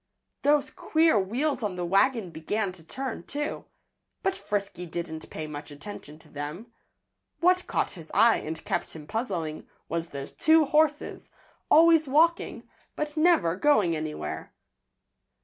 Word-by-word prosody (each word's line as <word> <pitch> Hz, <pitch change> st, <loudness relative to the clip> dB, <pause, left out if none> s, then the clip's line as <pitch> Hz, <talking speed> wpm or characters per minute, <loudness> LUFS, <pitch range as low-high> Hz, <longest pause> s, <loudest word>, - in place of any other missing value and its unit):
Those 290 Hz, 0 st, +3 dB
queer 320 Hz, -8 st, +3 dB
wheels 255 Hz, +10 st, -1 dB
on 205 Hz, -4 st, -2 dB
the 180 Hz, -1 st, -3 dB
wagon 200 Hz, +1 st, +2 dB
began 195 Hz, +5 st, -2 dB
to 180 Hz, -3 st, -14 dB
turn, 260 Hz, +6 st, -5 dB
too. 295 Hz, -, -4 dB, 0.6 s
But 385 Hz, -, +2 dB
Frisky 200 Hz, -, -4 dB
didn't 160 Hz, -1 st, -6 dB
pay 155 Hz, -, -5 dB
much 150 Hz, 0 st, -7 dB
attention 150 Hz, 0 st, -9 dB
to 160 Hz, -, -16 dB
them. 155 Hz, +11 st, -7 dB, 0.7 s
What 365 Hz, +1 st, +3 dB
caught -, -, 0 dB
his 165 Hz, -4 st, -11 dB
eye 230 Hz, 0 st, +5 dB
and 160 Hz, +1 st, -6 dB
kept -, -, -2 dB
him 155 Hz, -2 st, -9 dB
puzzling 175 Hz, -8 st, -3 dB, 0.2 s
was 165 Hz, +1 st, -3 dB
those 140 Hz, -1 st, -7 dB
two 315 Hz, 0 st, +4 dB
horses, 300 Hz, +1 st, +1 dB, 0.4 s
always 325 Hz, -1 st, +6 dB
walking, 325 Hz, +5 st, +2 dB, 0.3 s
but 300 Hz, 0 st, -3 dB
never 310 Hz, -, +3 dB
going 205 Hz, -, +3 dB
anywhere. 155 Hz, -, -5 dB
205 Hz, 140 wpm, -27 LUFS, -, 0.7 s, always